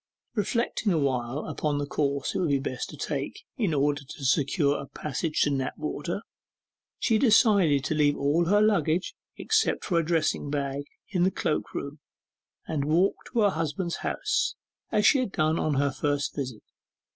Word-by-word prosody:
Reflecting 225 0 0
awhile 135 -4 0
upon 150 -2 -1
the 145 - -1
course 140 -1 -1
it - - -1
would 175 - +1
be 140 - +3
best 130 -2 -4
to 150 - -10
take, 140 -1 -4
in 210 -8 0
order 145 0 +1
to 135 +1 -8
secure 140 +2 +2
a 140 - -9
passage 150 +3 -2
to 145 - +3
Knapwater, 150 +7 -3 0.7
she 225 -3 +2
decided 200 - +4
to 155 - -1
leave 150 -1 +2
all 145 +5 +2
her 205 +4 +4
luggage, 180 -5 +1 0.2
except 440 - +1
a 170 -1 +4
dressing 160 -3 0
bag, 140 -1 -2 0.2
in 185 -4 0
the 185 - +5
cloak 155 -4 -2
room, 140 +1 -5 0.7
and 145 -3 -1
walk 170 +6 +3 0.2
to 235 - +1
her 205 -2 +4
husband's 165 +2 -2
house, 405 -2 -1 0.4
as 210 0 +2
she 275 - +6
had 250 -6 -1
done 155 -1 +1
on 155 -2 0
her 140 +1 +2
first 145 +1 -1
visit. 130 -6 -5
155 Hz, 170 wpm, -27 LUFS, 140-185 Hz, 0.7 s, she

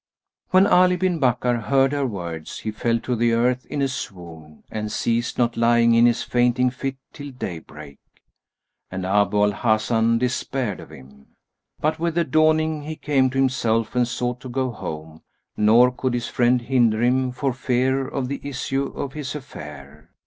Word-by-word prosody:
When 185 +1 +5
Ali 180 -1 +4
bin 180 -2 0
Bakkar 125 -3 +1
heard 135 -1 +3
her 140 -2 0
words, 85 -7 -6
he 110 - -3
fell 115 +2 0
to 125 - -2
the 115 0 +2
earth 125 +2 +1
in 145 -1 -2
a - - +2
swoon 85 - -8
and 105 -1 -4
ceased 120 +1 -1
not 120 -1 +1
lying 115 0 +4
in 115 +1 +6
his 120 - +1
fainting 125 +1 +2
fit 135 +1 -4 0.2
till 145 -1 -8
day 100 -10 -6
break; 75 -3 -13 0.9
and 95 0 -5
Abu 100 +1 +2
al 105 - +3
Hasan 110 +1 +1
despaired 125 -2 -2
of - - -11
him. 70 +1 -15 0.5
But, 155 +1 0
with 170 -1 -1
the 170 - +3
dawning, 155 -1 +2
he 155 +2 -6
came 135 -4 +1
to 130 - -5
himself 115 -4 +1
and 125 -1 +2
sought 125 0 -3
to 130 - -9
go 130 0 -1
home; 80 -6 -8 0.3
nor 115 +4 +5
could 125 0 -2
his 120 0 -2
friend 125 0 +2
hinder 120 -3 +2
him, 130 +1 +2
for 125 +1 -2
fear 130 +1 0
of 135 -2 -3
the 140 +2 -5
issue 135 0 -2
of 135 - -5
his 150 -2 -5
affair. 75 - -10
125 Hz, 180 wpm, -22 LUFS, 110-135 Hz, 0.9 s, in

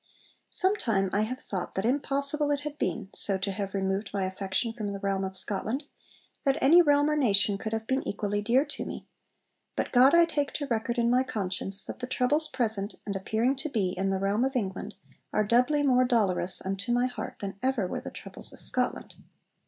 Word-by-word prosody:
'Sometime 225 - +1
I 205 - +2
have 235 +4 -2
thought 185 -3 -5
that 190 - -1
impossible 280 +3 +1
it 290 -1 0
had 295 0 -6
been, 195 -3 -2
so 195 -2 +3
to 190 +1 -2
have 195 0 -4
removed 195 +1 -1
my 200 -1 -1
affection 190 +4 -2
from 210 -3 -4
the 200 - -5
realm 195 -1 -1
of 190 0 -4
Scotland, 215 +8 -3 0.6
that 275 -1 +2
any 330 +6 +7
realm 290 -2 +4
or 305 - +1
nation 205 -7 +3
could 220 - -4
have 225 0 -2
been 265 +3 0
equally 205 0 -1
dear 245 +7 +3
to 290 - -6
me. - - -7 0.7
But - - -2
God 260 +5 +6
I 340 0 +7
take 290 -4 -2
to 290 - -2
record 235 -1 -1
in 235 0 +2
my 250 +1 +4
conscience 195 -4 -2
that - - -7
the 250 - -4
troubles 290 +5 +1
present 220 -5 -2
(and 200 - -3
appearing 220 +7 0
to 290 +3 -2
be) 210 -8 0
in 190 +1 -1
the 195 - +1
realm 200 +4 +1
of 265 +1 -1
England 195 -6 -3 0.4
are 215 - +2
doubly 250 +7 +3
more 255 -2 +4
dolorous 200 -8 +2
unto 195 +4 -2
my 245 +1 +3
heart 255 0 -5
than 200 -1 -6
ever 260 -6 +1
were - - -4
the - - -6
troubles - - -5
of - - -13
Scotland.' - - 0
225 Hz, 205 wpm, -28 LUFS, 195-270 Hz, 0.7 s, any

